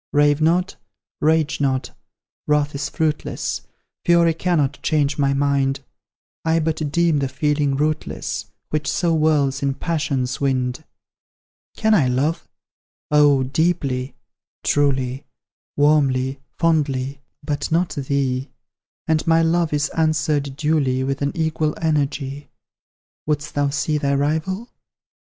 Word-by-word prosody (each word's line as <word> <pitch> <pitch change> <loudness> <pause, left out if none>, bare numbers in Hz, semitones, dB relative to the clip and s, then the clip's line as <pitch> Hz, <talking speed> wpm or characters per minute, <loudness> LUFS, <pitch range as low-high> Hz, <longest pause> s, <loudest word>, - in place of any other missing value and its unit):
Rave 145 0 +3
not, 175 +4 +2 0.4
rage 155 -1 +2
not, 130 -2 0 0.6
wrath 150 0 +2
is 140 +1 -3
fruitless, 155 -1 -2 0.4
Fury 170 -1 +4
cannot 155 -4 0
change 150 -2 +1
my 140 -1 +3
mind; 140 -1 +1 0.6
I 160 0 +2
but 155 -2 -1
deem 170 -2 +2
the 135 - 0
feeling 145 +1 0
rootless 155 +2 -2 0.2
Which 155 0 -1
so 170 -3 +1
whirls 145 -4 +2
in 140 -1 0
passion's 140 -7 -2
wind. 130 +1 -1 0.9
Can 220 0 +3
I 155 -11 +4
love? 135 +6 0 0.6
Oh, 145 -2 +5
deeply 140 -2 -1 0.5
truly 135 -2 0 0.5
Warmly 135 -3 +2 0.2
fondly 140 -4 0 0.2
but 145 +1 -3
not 170 +2 +2
thee; 135 -1 -1 0.6
And 160 +1 +1
my 165 0 +4
love 165 0 +1
is 145 -1 0
answered 155 -3 0
duly, 140 -4 +1
With 135 +1 -2
an 140 0 0
equal 160 -2 0
energy. 145 -2 -1 0.8
Wouldst 150 0 -1
thou 145 -1 +1
see 150 +2 0
thy 140 -1 +1
rival? 160 +10 -1
145 Hz, 120 wpm, -21 LUFS, 140-160 Hz, 0.9 s, Oh